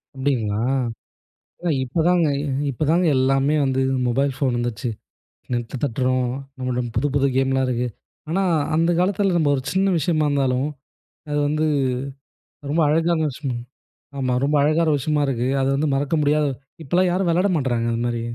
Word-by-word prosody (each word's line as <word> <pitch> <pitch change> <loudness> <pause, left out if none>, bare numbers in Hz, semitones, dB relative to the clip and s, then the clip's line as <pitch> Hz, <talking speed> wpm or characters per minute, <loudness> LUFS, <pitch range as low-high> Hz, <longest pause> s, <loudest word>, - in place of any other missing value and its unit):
அப்படிங்களா. 120 -6 -1 1.0
இல்ல 175 -2 -1
இப்பதாங்க, 165 +5 +2 0.4
இப்பதாங்க 160 +7 +1
எல்லாமே 135 +3 +2
வந்து 135 0 0 0.3
மொபைல் 135 +3 +1
போன் 130 -4 0
வந்துச்சு. 120 +1 -2 0.6
நெட்ட 120 +1 -3
தட்டுறோம். 130 0 0 0.3
நம்மகிட்ட 125 -2 -2
புதுப்புது 140 -1 +1
கேம்லாம் 135 0 +2
இருக்கு. 125 0 -1 0.4
ஆனா 195 +3 +1 0.3
அந்தக் 165 +1 +2
காலத்துல 195 0 +1
நம்ம 150 -3 +2
ஒரு 130 - -3
சின்ன 190 +1 +2
விஷயமா 155 -2 +1
இருந்தாலும், 135 -1 +1 0.6
அது 150 - -1
வந்து 155 +1 0 1.1
ரொம்ப 165 +2 +2
அழகானதுன்னு 165 0 +2
வச்சுக்கோங்களேன். 125 -3 -5 0.5
ஆமா 130 -1 0
ரொம்ப 150 +2 +1
அழகான 155 +2 +2
விஷயமா 150 +2 0
இருக்கு. 125 -2 -1
அத 135 - +1
வந்து 150 +2 0
மறக்க 145 +3 0
முடியாது. 150 0 +2 0.3
இப்ப 135 - -16
எல்லாம் 185 0 +4
யாரும் 185 0 0
விளையாட 180 +4 +2
மாட்றாங்க 120 -4 0
அது 115 - -2
மாதிரி. 120 -1 -2
140 Hz, 145 wpm, -22 LUFS, 130-160 Hz, 1.1 s, எல்லாம்